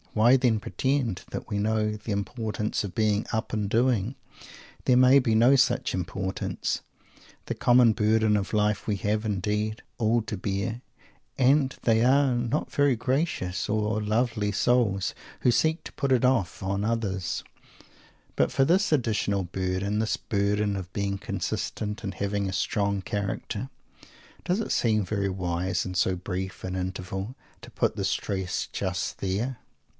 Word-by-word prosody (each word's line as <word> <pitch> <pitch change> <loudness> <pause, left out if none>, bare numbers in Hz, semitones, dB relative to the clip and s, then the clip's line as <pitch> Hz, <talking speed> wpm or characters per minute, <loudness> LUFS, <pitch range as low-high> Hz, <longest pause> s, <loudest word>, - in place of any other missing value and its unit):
Why, 115 +4 +5
then, 125 -4 +2
pretend 120 +2 -1
that - - -6
we 105 - -1
know 105 0 +1
the 105 +1 -6
importance 105 +1 -2
of 100 - -5
being 105 -1 +1
"up 110 -1 -2
and 105 -2 -1
doing"? 120 0 +1 0.7
There 125 - +4
may 130 +2 +7
be 115 -4 +1
no 120 +5 +6
such 135 - +2
importance. 95 +1 -2 0.6
The - - -2
common 120 -2 +5
burden 110 0 +3
of 100 -1 -1
life 105 -1 +1
we 105 -2 0
have, 105 +2 0
indeed, 105 +1 -1 0.2
all 115 +1 +3
to 110 - -4
bear 100 +4 -3 0.6
and 135 +1 +3
they 115 -1 +3
are 135 +1 +4
not 120 +5 -1
very 145 -4 +3
gracious 125 - -1
or 110 0 0
lovely 110 -1 0
souls 105 -3 +2 0.3
who 125 - +4
seek 160 +6 +1
to - - -8
put 140 -2 -1
it 130 -1 +4
off 125 -9 +1
on 100 +1 -1
others 105 -5 -1 0.9
but - - +2
for 135 - +3
this 185 +6 +3
additional 105 -8 +1
burden, 95 +3 -2
this 110 0 0
burden 100 0 0
of 95 -1 -6
"being 100 -1 -2
consistent" 105 +2 -3
and 100 - -4
having 100 -1 -1
a - - -4
"strong 100 +1 0
character," 105 +4 -3 0.7
does 180 +4 0
it 225 - -3
seem 110 -4 +2
very 100 0 -1
wise, 90 -1 -1
in 95 - -4
so 90 +1 +1
brief 95 +1 -5
an 95 0 -3
interval, 95 +4 -4 0.3
to - - -12
put - - 0
the - - -3
stress 95 -2 -2
just - - -2
there? 110 +6 -2
105 Hz, 155 wpm, -27 LUFS, 100-120 Hz, 0.9 s, may